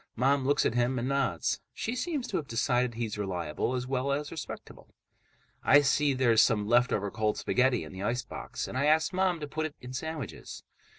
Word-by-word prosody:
Mom 135 +3 +2
looks 145 - +3
at - - +2
him 120 +2 +1
and 120 +1 -1
nods. 135 - 0 0.2
She 230 - -3
seems 285 -2 -2
to - - -1
have 150 - -4
decided 120 0 +1
he's 110 -3 -3
reliable, 90 +3 -2
as 125 0 -2
well 130 +1 -1
as 145 +1 -2
respectable. 165 - -9 0.7
I 145 +2 +7
see 145 0 +2
there's 120 -4 +4
some 105 -3 +2
leftover 120 -4 +2
cold 110 -1 0
spaghetti 125 -1 +2
in - - -10
the 95 - -7
icebox, 120 +3 -3
and 130 - -3
I 140 - +2
ask 155 +3 +3
Mom 185 -2 +1
to 150 - -4
put 155 +2 -2
it 150 - -14
in 125 +1 -9
sandwiches. 155 -2 -6
130 Hz, 195 wpm, -29 LUFS, 115-145 Hz, 0.7 s, I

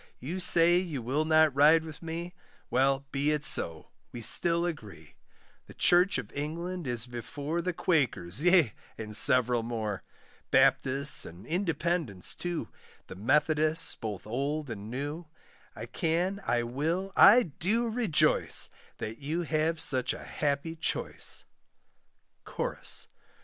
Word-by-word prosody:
You 165 +9 -6
say 175 0 +5
you 170 -7 -4
will 135 +6 -2
not 155 -2 +3
ride 155 +3 +5
with 160 -2 -10
me, 170 +1 -6 0.4
Well, 135 +1 +1
be 140 +2 -1
it 150 -1 -1
so, 80 - 0 0.2
we 120 - -8
still 170 +8 +3
agree; 115 - -8 0.5
The - - -14
church 180 0 +3
of 120 -5 -7
England 170 +3 -5
is 120 -2 -2
before 140 +7 -5
The 180 +2 -2
Quakers, 140 - -1
yea, 175 - +4 0.2
and 105 -1 -4
several 125 +1 +7
more. 110 -4 -4 0.5
Baptists, 140 +3 +3
and 85 +3 -11
Independents 165 - -2
too, 175 -2 -5 0.4
The - - -11
Methodists, 150 - +2
both 105 -5 -7
old 140 +5 -3
and 105 -1 -8
new; 145 +7 -6 0.5
I - - -7
can, 175 +5 -2
I 120 0 +1
will, 160 +11 -3
I 245 +5 +7
do 205 +8 -2
rejoice, 220 -8 +1 0.3
That 115 0 -7
you 155 +5 -3
have 155 +1 -1
such 130 -4 0
a - - -10
happy 145 +3 -3
choice. 160 - -2 1.0
CHORUS. - - -3
150 Hz, 135 wpm, -28 LUFS, 125-170 Hz, 1.0 s, several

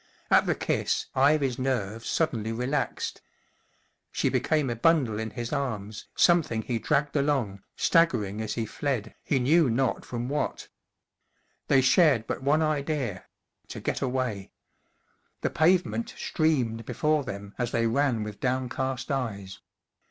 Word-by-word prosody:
At - - +5
the - - +2
kiss - - -1
Ivy's 135 -2 +3
nerves 115 -4 -2
suddenly 115 -9 0
relaxed. 125 +5 -2 0.9
She - - +1
became 150 -5 +1
a - - -2
bundle 125 -5 +2
in 110 0 -3
his 120 +3 -5
arms, 110 -7 -3
something 160 -11 +3
he 120 -2 -2
dragged 145 +5 0
along, 135 -9 0
staggering 115 - +2
as 110 -1 -3
he 115 - -1
fled, 115 -3 -3
he 140 - +1
knew 145 +4 +4
not 125 +2 0
from 120 0 -4
what. 145 +2 -3 1.0
They 135 - +5
shared 130 - +4
but - - -4
one 150 +4 +2
idea: 145 - -2 0.4
to - - -7
get - - -2
away. 125 -7 -2 0.9
The - - -1
pavement 180 +7 +1
streamed 130 -9 0
before 150 +3 +1
them 100 -4 -7
as 120 -1 0
they 115 0 0
ran 120 -1 +1
with 105 -1 -7
downcast 130 +1 -2
eyes. 100 -8 -3
130 Hz, 135 wpm, -27 LUFS, 110-145 Hz, 1.0 s, At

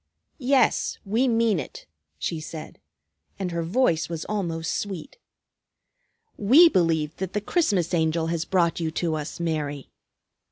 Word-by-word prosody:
"Yes, 270 0 +2
we 225 +7 +1
mean 225 -5 +2
it," - - -8 0.3
she 160 - -3
said, 155 0 -8 0.6
and 185 -2 -3
her 170 0 -2
voice 170 -2 +1
was 165 -2 -4
almost 170 -6 -2
sweet. 195 - -5 1.2
"We 275 - +7
believe 165 - +1
that 190 -1 -4
the 210 - +1
Christmas 205 - 0
Angel 160 -1 +1
has 165 0 -1
brought 170 -1 +1
you 165 -2 -1
to 165 0 -1
us, 155 +1 -5
Mary. 150 -4 -3
170 Hz, 135 wpm, -25 LUFS, 160-210 Hz, 1.2 s, We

